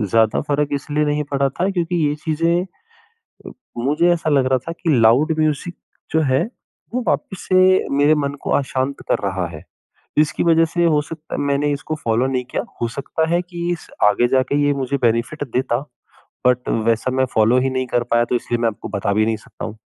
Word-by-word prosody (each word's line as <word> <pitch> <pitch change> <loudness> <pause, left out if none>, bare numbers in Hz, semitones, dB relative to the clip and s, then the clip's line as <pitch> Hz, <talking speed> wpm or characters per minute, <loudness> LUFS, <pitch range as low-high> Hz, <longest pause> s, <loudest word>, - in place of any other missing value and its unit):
ज़्यादा 110 +1 +2
फ़र्क़ 145 0 0
इसलिए 145 +2 -1
नहीं 150 0 0
पड़ा 140 -1 +1
था 175 +8 -1
क्योंकि 175 -2 -1
ये 145 - -1
चीज़ें 165 +2 +1 0.6
अ, - - -14 0.3
मुझे 145 +8 +2
ऐसा 165 -2 -1
लग 135 -3 +3
रहा 130 0 +2
था - - -2
कि 165 -2 0
लाउड 125 +8 +4
म्यूज़िक 155 +2 0 0.4
जो 160 - +3
है 130 - +3 0.5
वो 250 - 0
वापिस 150 +6 -1
से 185 0 +4
मेरे 145 +2 +5
मन 140 -2 -1
को - - -3
अशांत 135 0 -2
कर - - +2
रहा 95 -2 -2
है, 75 -2 -10 0.6
जिसकी 155 0 +2
वजह 165 -1 +4
से 170 +2 -1
हो 155 -3 +3
सकता 160 +1 -9
है - - -3
मैंने 145 +1 +1
इसको 150 +2 -4
फ़ॉलो 115 +3 +2
नहीं 130 -1 -1
किया, - - -3 0.2
हो 120 - +1
सकता 140 +6 -2
है 175 +1 +2
कि 175 -1 -5
इस 175 - -5 0.2
आगे 105 +4 +4
जाके 130 +3 +1
ये 145 - +3
मुझे 140 0 -2
बेनिफिट 120 +6 0
देता 125 -2 +1 0.7
बट 125 0 +1 0.2
वैसा 115 +3 +1
मैं 130 0 +2
फ़ॉलो 110 +3 +4
ही 130 +1 +1
नहीं 130 -1 -2
कर 120 0 0
पाया 120 0 +4
तो 125 - -1
इसलिए 120 0 -1
मैं 115 - +3
आपको 105 - -9
बता 100 -1 -1
भी 110 +1 +2
नहीं 110 -1 0
सकता - - -9
हूँ। 110 0 -8
140 Hz, 210 wpm, -20 LUFS, 120-160 Hz, 0.7 s, मेरे